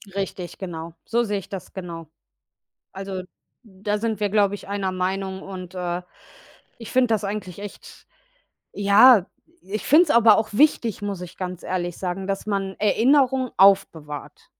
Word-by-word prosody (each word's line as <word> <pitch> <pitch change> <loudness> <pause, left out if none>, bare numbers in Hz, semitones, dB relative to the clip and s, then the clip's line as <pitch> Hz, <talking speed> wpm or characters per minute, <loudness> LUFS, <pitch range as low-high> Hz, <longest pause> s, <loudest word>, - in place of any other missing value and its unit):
Richtig, 195 -2 -4
genau. 165 -3 -7
So 235 +1 +1
sehe 205 -2 -1
ich - - -13
das 195 -3 -8
genau. 170 -4 -7 0.9
Also, 195 -1 -5 0.4
da 210 0 -4
sind 220 -1 -2
wir, 205 - +1
glaube 205 -1 +2
ich, 200 - -9
einer 195 -2 -2
Meinung 190 +1 -3
und, 185 -1 -8
äh, 180 0 -3 0.8
ich 230 - -9
finde 255 -1 +3
das 215 -2 0
eigentlich 200 -3 -5
echt, 205 -1 -11 0.7
ja 205 +1 +6 0.4
ich 210 +3 -5
finde 320 +6 +7
es 300 - -6
aber 225 -4 +6
auch 220 - 0
wichtig, 235 -6 +2
muss 200 -3 -3
ich 180 0 -10
ganz 180 -1 -5
ehrlich 175 -2 -3
sagen, 190 +1 -3
dass 195 +1 -3
man 195 -2 -2
Erinnerungen 255 +4 +3
aufbewahrt. 160 -7 +2
195 Hz, 155 wpm, -23 LUFS, 185-215 Hz, 0.9 s, finde